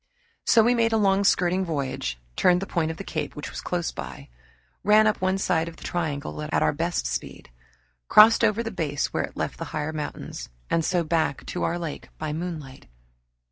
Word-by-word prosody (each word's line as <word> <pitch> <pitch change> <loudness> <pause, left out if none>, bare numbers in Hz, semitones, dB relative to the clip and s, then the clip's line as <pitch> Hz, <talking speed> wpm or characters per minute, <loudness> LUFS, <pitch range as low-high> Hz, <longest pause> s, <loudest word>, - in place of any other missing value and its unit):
So 225 - +6
we 240 +2 +4
made 230 -1 +2
a - - +4
long 200 -1 +3
skirting 185 -1 +3
voyage, 135 - -3 0.2
turned 180 -1 +4
the 195 - -3
point 170 -4 -1
of 160 - -5
the - - -6
cape - - -4
which 150 - -6
was - - -6
close 175 -2 -2
by, 70 - -8 0.5
ran 215 +1 +6
up 215 -3 +1
one 185 +1 +2
side 170 -4 +1
of 165 - -8
the - - -12
triangle 150 -4 -3
at 150 0 0
our - - +2
best 165 - -1
speed, - - -5 0.6
crossed 225 +2 +7
over 225 +1 +3
the 225 - -4
base 145 -3 -2
where - - 0
it - - -15
left - - -3
the - - -3
higher 155 +1 -2
mountains, 150 - -6 0.2
and 165 - +2
so 175 +1 +1
back 160 -3 0
to 180 - -4
our 170 - 0
lake 165 -3 -6
by 155 -1 -3
moonlight. 155 -5 -6
170 Hz, 205 wpm, -25 LUFS, 150-195 Hz, 0.6 s, crossed